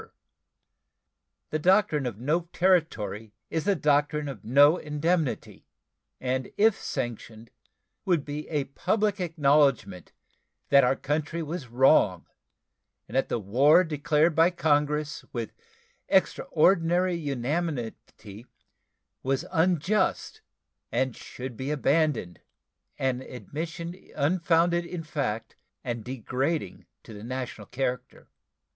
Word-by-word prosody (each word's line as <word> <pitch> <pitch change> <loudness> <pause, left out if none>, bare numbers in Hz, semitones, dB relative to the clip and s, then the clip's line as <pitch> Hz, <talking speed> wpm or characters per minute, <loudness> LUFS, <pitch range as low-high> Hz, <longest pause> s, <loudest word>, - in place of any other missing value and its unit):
The 155 - -1
doctrine 175 -5 +3
of 115 -5 -5
no 160 +8 -1
territory 115 - 0 0.2
is 160 - -2
the 200 -1 +3
doctrine 145 -1 +1
of 130 -8 -7
no 145 +7 +5
indemnity, 155 0 -2 0.5
and 130 0 -2
if 215 0 +4
sanctioned 115 -3 -5 0.5
would 170 -6 +1
be 150 +1 -6
a 150 -3 0
public 205 +9 -1
acknowledgment 140 - +1 0.6
that 140 -1 +6
our 125 +2 +3
country 155 +4 -2
was 155 -3 -5
wrong 120 - +3 0.8
and - - -9
that 135 - +1
the - - 0
war 130 - +4
declared 150 +1 +1
by 165 +3 +5
Congress 150 -3 0
with 115 -3 -5 0.6
extraordinary 175 +2 +2
unanimity 130 - -4 0.7
was 135 +4 -1
unjust 185 +3 +1 0.5
and 130 -2 0
should 130 -1 -8
be 130 +4 -5
abandoned 145 - 0 0.6
an 130 -1 -1
admission 165 +7 -6 0.2
unfounded 170 +2 +2
in 170 -1 -6
fact 115 -8 -3 0.3
and 120 -3 -4
degrading 130 - -3 0.2
to - - -12
the 105 0 -10
national 125 -4 -6
character. 125 -1 -4
145 Hz, 105 wpm, -27 LUFS, 125-165 Hz, 0.8 s, that